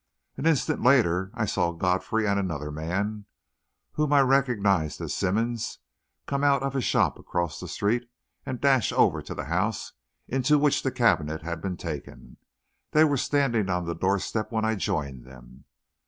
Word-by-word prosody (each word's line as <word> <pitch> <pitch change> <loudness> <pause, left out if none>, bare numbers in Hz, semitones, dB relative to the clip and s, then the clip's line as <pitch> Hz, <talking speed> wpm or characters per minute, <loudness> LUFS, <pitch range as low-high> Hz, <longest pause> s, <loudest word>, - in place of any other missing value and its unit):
An 155 - -1
instant 155 -6 +1
later, 95 -8 +3
I 110 - 0
saw 85 -3 0
Godfrey 95 +6 0
and 100 0 +2
another 75 -6 -3
man 100 +7 -3 0.7
whom 150 -1 -1
I 140 - +6
recognised 115 - +2
as - - -4
Simmonds, 110 +4 -1 0.5
come 140 0 -2
out 140 -2 +3
of 135 0 -2
a 135 - +1
shop - - +1
across 85 -3 -3
the - - -7
street 120 +4 -1 0.3
and 125 - -5
dash 135 -4 +3
over - - +3
to - - -7
the 75 - -5
house 95 +7 -1 0.3
into 135 +4 +2
which 145 -1 +2
the 135 - 0
cabinet 80 -11 +1
had 85 -1 -4
been 90 -1 -3
taken. 80 -6 -8 0.6
They 155 - +6
were 145 -2 +3
standing 125 -7 +1
on 90 -1 -1
the 85 - -2
door 95 +3 +1
step 110 +3 -3
when 110 -1 0
I 110 - +1
joined 75 - -3
them. 65 +1 -15
105 Hz, 170 wpm, -26 LUFS, 85-130 Hz, 0.7 s, I